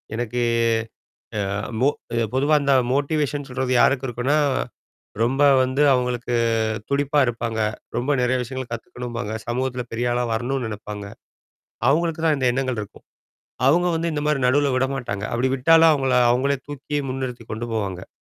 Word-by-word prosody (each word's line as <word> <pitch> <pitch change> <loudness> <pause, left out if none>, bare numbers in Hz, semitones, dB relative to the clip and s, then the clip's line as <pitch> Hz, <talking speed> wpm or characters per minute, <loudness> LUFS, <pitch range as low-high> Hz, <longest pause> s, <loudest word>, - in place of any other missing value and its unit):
எனக்கு 120 +1 -2 1.0
அ - - +1 0.4
மோ 140 - +5 0.4
பொதுவா 145 +4 +3
அந்த 140 -1 +2 0.2
மோட்டிவேஷன் 145 0 0
சொல்றது 130 0 -2
யாருக்கு 135 -1 +3
இருக்குனா, 125 +5 0 0.9
ரொம்ப 135 +4 +1 0.2
வந்து 130 +3 0
அவங்களுக்கு 125 -1 -1 0.6
துடிப்பா 145 +1 +1
இருப்பாங்க. 115 -1 -3 0.4
ரொம்ப 130 +4 0
நிறைய 125 +1 +2
விஷயங்கள் 130 0 -6
கத்துக்கணும்பாங்க. 120 -1 -6 0.2
சமூகத்தில 125 +1 -2
பெரிய 120 +1 -1
ஆளா 125 0 0
வரணும்னு 125 +2 -2
நெனைப்பாங்க. 105 -1 -7 0.8
அவங்களுக்கு 165 +2 +1
தான் 155 -3 +3
இந்த 130 -2 +1
எண்ணங்கள் 130 -4 -1
இருக்கும். 100 - -12 0.6
அவங்க 175 +5 +3
வந்து 165 +1 -1
இந்த 150 - -2
மாரி 150 -3 +1
நடுவுல 140 +1 +3
விட 130 +1 +1
மாட்டாங்க. 100 -5 -4
அப்படி 125 +2 +1
விட்டாலும், 165 +4 +6
அவங்கள 135 -3 0 0.2
அவங்களே 135 +3 +1
தூக்கி 145 +1 -4
முன்னிறுத்திக் 125 -4 -5
கொண்டு 120 +2 -5
போவாங்க. 95 -4 -3
130 Hz, 140 wpm, -22 LUFS, 120-140 Hz, 1.0 s, விட்டாலும்